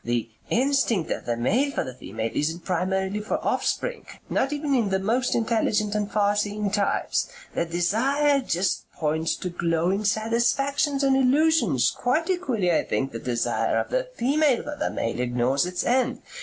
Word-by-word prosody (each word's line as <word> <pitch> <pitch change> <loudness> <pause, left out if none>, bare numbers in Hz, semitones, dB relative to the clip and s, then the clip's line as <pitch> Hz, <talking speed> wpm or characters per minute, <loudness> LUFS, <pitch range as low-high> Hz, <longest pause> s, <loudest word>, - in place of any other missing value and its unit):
The 120 -1 -2 0.2
instinct 250 - +1
of - - -3
the 120 -1 0
male 230 - +1
for 280 - -2
the 130 - -7
female 110 -1 -5
isn't 160 +3 -2
primarily 190 +2 -1
for 210 - -2
offspring - - -1 0.2
not 270 - +1
even 295 -1 -1
in 235 -6 +2
the 190 - +1
most 230 +7 0
intelligent 220 -2 +1
and 210 -1 -2
farseeing 205 0 0
types. 205 - 0 0.2
The 170 - 0
desire 245 - +2
just 185 -6 -1
points 160 +1 -1
to 180 - -4
glowing 175 +3 0
satisfactions 240 +7 +1
and 270 -1 +4
illusions. 260 - +3
Quite 310 +9 0
equally 250 - 0
I 160 - +2
think 135 - -2
the 115 - -5
desire 120 0 0
of - - -2
the - - 0
female 280 0 +2
for 295 0 -5
the 300 - -1
male 115 - -3
ignores 125 +5 +1
its 180 0 -2
end. 255 +1 +1
210 Hz, 165 wpm, -25 LUFS, 170-270 Hz, 0.2 s, and